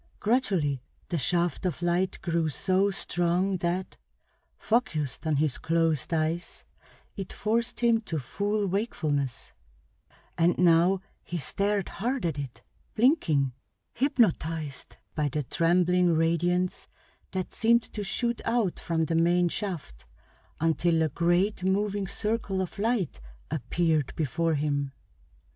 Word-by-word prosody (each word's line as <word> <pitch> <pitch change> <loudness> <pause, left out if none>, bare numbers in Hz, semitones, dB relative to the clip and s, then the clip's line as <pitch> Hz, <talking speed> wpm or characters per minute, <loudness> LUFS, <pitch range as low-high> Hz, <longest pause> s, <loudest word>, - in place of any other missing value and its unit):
Gradually 190 - +1 0.3
the 170 - 0
shaft 170 +5 +1
of 180 -2 -2
light 175 +2 +1
grew 170 -2 +1
so 190 +5 +2
strong 185 0 0
that, 175 +2 -2 0.6
focused 160 - -1
on 155 - +2
his 145 -2 0
closed 165 -1 +1
eyes, 165 +2 -1 0.5
it 195 -3 -6
forced 230 +4 -1
him 230 -2 +4
to 170 -7 -4
full 205 - -1
wakefulness; 155 - -2 0.9
and 170 +1 +3
now 180 +2 +4 0.2
he 175 - -4
stared 200 +6 0
hard 245 +1 -2
at 155 -4 -1
it, 125 -4 -7 0.3
blinking, 160 - +3 0.4
hypnotized 165 - 0 0.2
by 150 -2 0
the 150 +2 -2
trembling 175 +4 +3
radiance 175 +3 +1 0.4
that 185 -1 -3
seemed 235 +1 +3
to 210 - -3
shoot 235 +4 -1
out 230 -6 0
from 165 -2 0
the 165 - -2
main 175 +2 +3
shaft 155 - -5 0.5
until 165 0 +2
a 160 - +1
great 175 +6 +1
moving 200 +1 0
circle 210 0 -2
of 190 +1 -4
light 210 - 0 0.3
appeared 155 +1 0
before 160 +2 0
him. 145 -2 -1
175 Hz, 120 wpm, -28 LUFS, 160-200 Hz, 0.9 s, him